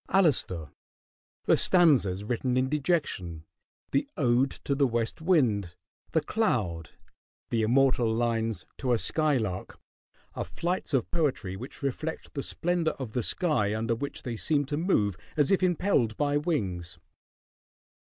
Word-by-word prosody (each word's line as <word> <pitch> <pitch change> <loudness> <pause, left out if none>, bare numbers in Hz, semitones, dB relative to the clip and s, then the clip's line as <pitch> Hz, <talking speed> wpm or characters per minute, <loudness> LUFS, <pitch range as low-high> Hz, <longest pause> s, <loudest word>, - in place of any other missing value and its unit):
"Alastor," 120 - +2 0.7
the - - +5
"Stanzas 135 - +4
Written 125 +3 -1
in 130 +1 +1
Dejection," 140 - -1 0.5
the 280 0 0
"Ode 125 0 +3
to 140 - 0
the 140 0 +3
West 115 +3 -2
Wind," 115 - +2 0.4
"The 160 - +3
Cloud," 105 - -1 0.6
the 115 - +1
immortal 125 0 +3
lines 115 -1 -1
"To 125 -2 +1
a - - +3
Skylark," 120 - 0 0.5
are - - -3
flights 175 -3 -2
of 125 - 0
poetry 135 - -1
which 125 +7 -9
reflect 155 +4 -3
the 140 - -2
splendor 175 +2 -1
of 125 -5 -6
the 125 - 0
sky 115 - 0
under 115 +1 0
which 140 +5 -5
they 120 -2 -4
seem 145 +4 +1
to 145 +2 -3
move 105 - +1 0.2
as 150 +2 +3
if 195 - +3
impelled 175 - +1
by 145 -1 +1
wings. 100 - -1
130 Hz, 140 wpm, -28 LUFS, 110-155 Hz, 0.7 s, the